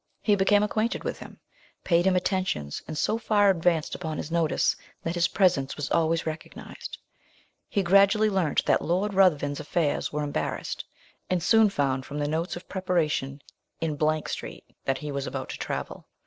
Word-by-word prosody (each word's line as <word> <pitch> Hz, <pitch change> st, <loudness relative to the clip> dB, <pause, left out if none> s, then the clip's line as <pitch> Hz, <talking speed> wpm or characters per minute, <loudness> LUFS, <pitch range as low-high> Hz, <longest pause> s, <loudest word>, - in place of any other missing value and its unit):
He 210 Hz, -, +4 dB
became 205 Hz, +1 st, +4 dB
acquainted 215 Hz, +3 st, -1 dB
with -, -, -3 dB
him, -, -, -11 dB, 0.4 s
paid 170 Hz, 0 st, +3 dB
him 190 Hz, -, +3 dB
attentions, 180 Hz, -, -1 dB
and 155 Hz, -, -5 dB
so 220 Hz, +8 st, +1 dB
far 205 Hz, -3 st, +4 dB
advanced 170 Hz, -3 st, +1 dB
upon 160 Hz, -3 st, -4 dB
his 155 Hz, -, -5 dB
notice, 165 Hz, -2 st, +2 dB, 0.3 s
that 165 Hz, -, -2 dB
his 175 Hz, 0 st, +2 dB
presence 170 Hz, -9 st, +2 dB
was 145 Hz, -1 st, -4 dB
always 165 Hz, 0 st, +2 dB
recognised. 160 Hz, 0 st, -7 dB, 0.7 s
He 200 Hz, -, +1 dB
gradually 200 Hz, +4 st, +5 dB
learnt 190 Hz, -7 st, +1 dB
that -, -, +3 dB
Lord 190 Hz, +5 st, 0 dB
Ruthven's 150 Hz, -7 st, +3 dB
affairs 150 Hz, 0 st, -1 dB
were 150 Hz, 0 st, -2 dB
embarrassed, 145 Hz, -, -3 dB, 0.5 s
and 180 Hz, -2 st, 0 dB
soon 220 Hz, +2 st, +5 dB
found, 135 Hz, -7 st, -1 dB
from 145 Hz, -, -6 dB
the 145 Hz, 0 st, -1 dB
notes 160 Hz, +4 st, -2 dB
of 175 Hz, -, -9 dB
preparation 155 Hz, -7 st, -1 dB, 0.4 s
in 160 Hz, -2 st, -1 dB, 0.3 s
Street, -, -, -6 dB, 0.2 s
that 135 Hz, 0 st, +1 dB
he 150 Hz, +1 st, -5 dB
was 140 Hz, -1 st, -3 dB
about -, -, -5 dB
to -, -, -5 dB
travel. -, -, -5 dB
170 Hz, 170 wpm, -27 LUFS, 150-195 Hz, 0.7 s, gradually